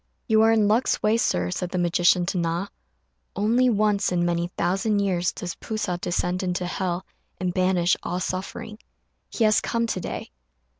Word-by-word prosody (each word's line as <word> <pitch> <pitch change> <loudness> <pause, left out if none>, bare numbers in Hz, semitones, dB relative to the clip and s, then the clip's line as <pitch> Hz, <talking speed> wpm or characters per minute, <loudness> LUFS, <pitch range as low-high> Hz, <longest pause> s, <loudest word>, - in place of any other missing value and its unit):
"You 220 0 +4
are 225 0 +5
in 215 -2 +3
luck's 225 +5 +1
way, 215 +1 +3
Sir," 90 - 0
said 180 - -3
the 185 - -3
magician 175 +1 +3
to 180 - -2
Na; 170 +3 -1 0.7
"only 235 +5 +3
once 210 -3 +2
in 175 -1 +1
many 170 0 0
thousand 195 +5 +1
years 185 -3 +1
does 175 -1 -5
P'u 220 - -6
sa 180 -5 -1
descend 180 +1 -1
into 180 -1 -2
hell 180 0 -2 0.3
and 180 -1 -1
banish 185 -1 +2
all 180 +1 -3
suffering. 190 +4 -5 0.5
He 230 - -1
has 215 -1 +4
come 230 0 -1
to 225 - -2
day." - - -6
185 Hz, 180 wpm, -24 LUFS, 175-215 Hz, 0.7 s, are